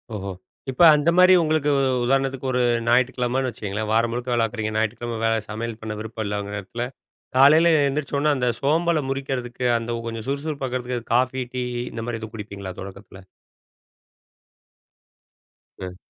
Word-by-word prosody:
ஓஹோ! 100 Hz, -1 st, -5 dB, 0.4 s
இப்ப 125 Hz, -, -3 dB
அந்த 150 Hz, +3 st, +2 dB
மாரி 185 Hz, 0 st, +7 dB
உங்களுக்கு 155 Hz, -2 st, +1 dB
உ -, -, +2 dB, 0.2 s
உதாரணத்துக்கு 135 Hz, 0 st, 0 dB
ஒரு 125 Hz, 0 st, +1 dB, 0.3 s
ஞாயிற்றுக்கிழமைன்னு 125 Hz, +1 st, +1 dB
வச்சுக்கங்களேன், 105 Hz, -1 st, -4 dB
வாரம் 115 Hz, +1 st, +2 dB
முழுக்க 120 Hz, +1 st, -4 dB
வேலை 120 Hz, -, +2 dB
பாக்குறீங்க. 110 Hz, -1 st, -3 dB
ஞாயிற்றுக்கிழமை 110 Hz, +1 st, -2 dB
வே 115 Hz, -, +3 dB, 0.2 s
சமையல் 110 Hz, +1 st, -5 dB
பண்ண 110 Hz, -1 st, -4 dB
விருப்பம் 110 Hz, 0 st, -5 dB
இல்லைங்கிற 100 Hz, 0 st, -3 dB
நேரத்துல, 115 Hz, +5 st, -5 dB, 0.5 s
காலையில 155 Hz, +5 st, +7 dB, 0.2 s
எந்திரிச்சோன்ன 145 Hz, +1 st, 0 dB
அந்த 125 Hz, -1 st, +1 dB
சோம்பல 160 Hz, +2 st, +2 dB
முறிக்கிறதுக்கு, 130 Hz, -2 st, -3 dB
அந்த 115 Hz, 0 st, -3 dB
கொஞ்சம் 115 Hz, +1 st, -6 dB
சுறுசுறுப்பாக்கிறதுக்கு 130 Hz, -4 st, -3 dB
காஃபி, 130 Hz, +1 st, +1 dB
டீ 125 Hz, -, -1 dB, 0.3 s
இந்த 115 Hz, -, -5 dB
மாரி 115 Hz, -2 st, -3 dB
எதுவும் 110 Hz, 0 st, -8 dB
குடிப்பீங்களா, 100 Hz, -3 st, -7 dB
தொடக்கத்தில? 95 Hz, 0 st, -11 dB, 2.6 s
ம். 90 Hz, -1 st, -6 dB
120 Hz, 140 wpm, -23 LUFS, 110-135 Hz, 2.6 s, மாரி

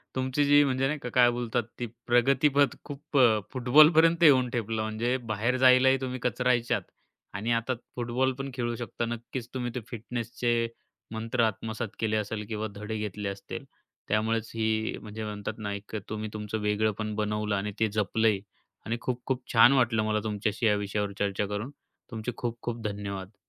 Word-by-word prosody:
तुमची 130 Hz, +2 st, +1 dB
जी 145 Hz, +1 st, +6 dB
म्हणजे 135 Hz, -1 st, +1 dB
नाही 150 Hz, +1 st, -2 dB
का 125 Hz, -, -5 dB
काय 120 Hz, -1 st, +6 dB
बोलतात 120 Hz, 0 st, -1 dB, 0.2 s
ती 120 Hz, -, -1 dB, 0.2 s
प्रगतीपथ 135 Hz, +4 st, +3 dB
खूप 145 Hz, 0 st, -5 dB
अ, 115 Hz, -5 st, +6 dB
फुटबॉलपर्यंत 155 Hz, +6 st, +6 dB
येऊन 130 Hz, -5 st, +6 dB
ठेपला 115 Hz, -2 st, -2 dB
म्हणजे 110 Hz, +3 st, -1 dB, 0.2 s
बाहेर 115 Hz, +4 st, +1 dB
जायलाही 130 Hz, +1 st, +6 dB
तुम्ही 130 Hz, -1 st, -3 dB
कचरायचात 120 Hz, -2 st, +1 dB, 0.5 s
आणि 105 Hz, +5 st, -2 dB
आता 115 Hz, +2 st, +1 dB, 0.2 s
फुटबॉल 125 Hz, +2 st, 0 dB
पण 135 Hz, 0 st, -3 dB
खेळू 120 Hz, -2 st, -2 dB
शकता. 120 Hz, 0 st, -4 dB
नक्कीच 120 Hz, +1 st, -5 dB
तुम्ही 125 Hz, -2 st, -3 dB
ते -, -, -1 dB
फिटनेसचे 120 Hz, 0 st, -2 dB, 0.5 s
मंत्र 115 Hz, +2 st, 0 dB
आत्मसात 110 Hz, +1 st, -2 dB
केले 110 Hz, -1 st, 0 dB
असेल 105 Hz, 0 st, -3 dB
किंवा 110 Hz, 0 st, -2 dB
धडे 105 Hz, +2 st, -4 dB
घेतले 105 Hz, -1 st, -3 dB
असतील, 100 Hz, 0 st, -7 dB, 0.4 s
त्यामुळेच 110 Hz, +1 st, 0 dB
ही 110 Hz, 0 st, 0 dB
म्हणजे 110 Hz, +1 st, -7 dB
म्हणतात 105 Hz, -1 st, -4 dB
ना, 105 Hz, -2 st, -4 dB
एक 100 Hz, +2 st, -7 dB
तुम्ही 110 Hz, 0 st, -4 dB
तुमचं 105 Hz, 0 st, -4 dB
वेगळेपण 105 Hz, +1 st, 0 dB
बनवलं 105 Hz, 0 st, -1 dB
आणि 100 Hz, +1 st, -2 dB
ते 110 Hz, -, +3 dB
जपलंही 105 Hz, 0 st, +1 dB, 0.4 s
आणि 115 Hz, +2 st, -1 dB
खूप-खूप 125 Hz, +1 st, -2 dB
छान 120 Hz, +3 st, +8 dB
वाटलं 115 Hz, -4 st, +3 dB
मला 110 Hz, 0 st, +1 dB
तुमच्याशी 105 Hz, +1 st, -1 dB
या 105 Hz, -2 st, +4 dB
विषयावर 100 Hz, 0 st, -2 dB
चर्चा 100 Hz, 0 st, 0 dB
करून. 105 Hz, +6 st, -4 dB, 0.4 s
तुमचे 110 Hz, +2 st, -4 dB
खूप-खूप 120 Hz, 0 st, -4 dB
धन्यवाद. 100 Hz, -1 st, -6 dB
115 Hz, 160 wpm, -28 LUFS, 105-125 Hz, 0.5 s, छान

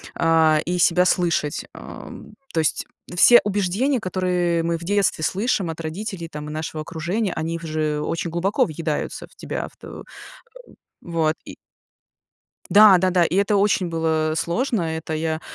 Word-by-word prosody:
а, 160 Hz, -2 st, +3 dB
и 180 Hz, +1 st, -1 dB
себя 180 Hz, +1 st, +4 dB
слышать. 170 Hz, -4 st, 0 dB
Ам, -, -, -11 dB, 0.2 s
то 165 Hz, -, +1 dB
есть 155 Hz, -, 0 dB, 0.3 s
все 240 Hz, +7 st, +8 dB
убеждения, 205 Hz, +7 st, 0 dB
которые 180 Hz, -3 st, 0 dB
мы 170 Hz, 0 st, -1 dB
в 170 Hz, -, -11 dB
детстве 195 Hz, -4 st, +1 dB
слышим 195 Hz, -3 st, 0 dB
от 160 Hz, -, -8 dB
родителей 170 Hz, +2 st, -5 dB
там 150 Hz, -1 st, -7 dB
и -, -, -6 dB
нашего 155 Hz, 0 st, -5 dB
окружения, 175 Hz, +6 st, -3 dB
они 165 Hz, +1 st, -3 dB
в 170 Hz, -, -12 dB
же 155 Hz, -2 st, -2 dB
очень 165 Hz, +3 st, -3 dB
глубоко 175 Hz, +5 st, +1 dB
въедаются 155 Hz, -1 st, -4 dB
в -, -, -25 dB
тебя, -, -, -5 dB
в -, -, -28 dB
т -, -, -12 dB
э, -, -, -9 dB, 1.0 s
вот. 160 Hz, -2 st, 0 dB
И -, -, -10 dB, 1.1 s
Да 205 Hz, -2 st, +8 dB
да-да, 180 Hz, -1 st, +2 dB
и 165 Hz, -, -2 dB
это 200 Hz, +1 st, +2 dB
очень 195 Hz, -2 st, +2 dB
было 160 Hz, -1 st, 0 dB
сложно, 230 Hz, +4 st, -1 dB
это 160 Hz, 0 st, -4 dB
я, 160 Hz, 0 st, -2 dB
170 Hz, 160 wpm, -22 LUFS, 160-190 Hz, 1.1 s, все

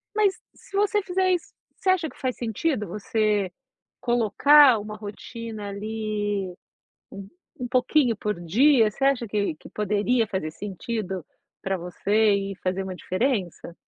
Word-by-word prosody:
Mas 415 Hz, -3 st, +3 dB, 0.2 s
se 390 Hz, -, -13 dB
você 415 Hz, +1 st, +2 dB
fizer 375 Hz, 0 st, +1 dB
isso, 355 Hz, -2 st, -2 dB, 0.2 s
você 385 Hz, -, -1 dB
acha 355 Hz, -4 st, +2 dB
que -, -, -18 dB
faz 255 Hz, -2 st, -2 dB
sentido 225 Hz, -, -1 dB
você 210 Hz, 0 st, 0 dB, 0.5 s
colocar 245 Hz, +2 st, +6 dB
uma 210 Hz, +1 st, -7 dB
rotina 215 Hz, +1 st, -7 dB
ali, 205 Hz, -2 st, -3 dB, 0.6 s
um 195 Hz, 0 st, -8 dB, 0.3 s
um 245 Hz, -, -3 dB
pouquinho 255 Hz, -1 st, +2 dB
por 210 Hz, -3 st, -3 dB
dia? 225 Hz, -, +4 dB
Você 270 Hz, +6 st, -3 dB
acha 270 Hz, -4 st, +2 dB
que 200 Hz, -5 st, 0 dB
que -, -, -14 dB
poderia 210 Hz, +3 st, +1 dB
fazer 190 Hz, -6 st, -3 dB
sentido 195 Hz, -, -5 dB, 0.4 s
pra 195 Hz, 0 st, -1 dB
você 205 Hz, +5 st, +1 dB
e 195 Hz, -1 st, -2 dB
fazer 185 Hz, +1 st, -1 dB
uma 190 Hz, -1 st, -5 dB
diferença? 185 Hz, -, -2 dB
215 Hz, 145 wpm, -25 LUFS, 195-255 Hz, 0.6 s, colocar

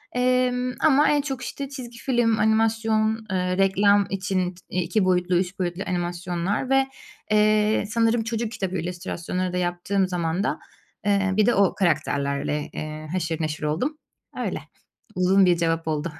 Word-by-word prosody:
Emm, 250 Hz, 0 st, +1 dB
ama 295 Hz, -1 st, +5 dB
en 290 Hz, -1 st, +3 dB
çok, 270 Hz, -3 st, -4 dB
işte, 275 Hz, -1 st, -5 dB
çizgi 250 Hz, -4 st, -8 dB
film, 240 Hz, -4 st, +1 dB
animasyon, 220 Hz, 0 st, +1 dB
eee, 180 Hz, 0 st, 0 dB
reklam 200 Hz, +1 st, +4 dB
için 190 Hz, -2 st, -1 dB
t 180 Hz, -, -18 dB, 0.2 s
2 185 Hz, +4 st, +1 dB
boyutlu, 180 Hz, 0 st, +2 dB
3 185 Hz, +1 st, -2 dB
boyutlu 180 Hz, +1 st, -2 dB
animasyonlar 175 Hz, +4 st, -2 dB
ve, 270 Hz, 0 st, +3 dB, 0.4 s
eee, 215 Hz, 0 st, +3 dB
sanırım 230 Hz, 0 st, +2 dB
çocuk 225 Hz, 0 st, -3 dB
kitabı 190 Hz, -4 st, -3 dB
illüstrasyonları 180 Hz, +1 st, -3 dB
da -, -, -1 dB
yaptığım 180 Hz, +2 st, 0 dB
zamanda, 175 Hz, +2 st, -1 dB, 0.5 s
eee, 200 Hz, -2 st, +2 dB
bir 210 Hz, -, +5 dB
de 240 Hz, -, +3 dB
o 195 Hz, -2 st, +3 dB
karakterlerle, 145 Hz, -4 st, 0 dB
eee, 155 Hz, 0 st, -6 dB
haşır 165 Hz, -3 st, -2 dB
neşir 155 Hz, 0 st, -3 dB
oldum. 185 Hz, -, -1 dB, 0.4 s
Öyle. -, -, -2 dB, 0.6 s
Uzun 185 Hz, +1 st, +4 dB
bir 175 Hz, -1 st, +3 dB
cevap 165 Hz, -1 st, 0 dB
oldu. 155 Hz, +1 st, -1 dB
190 Hz, 150 wpm, -24 LUFS, 175-225 Hz, 0.6 s, ama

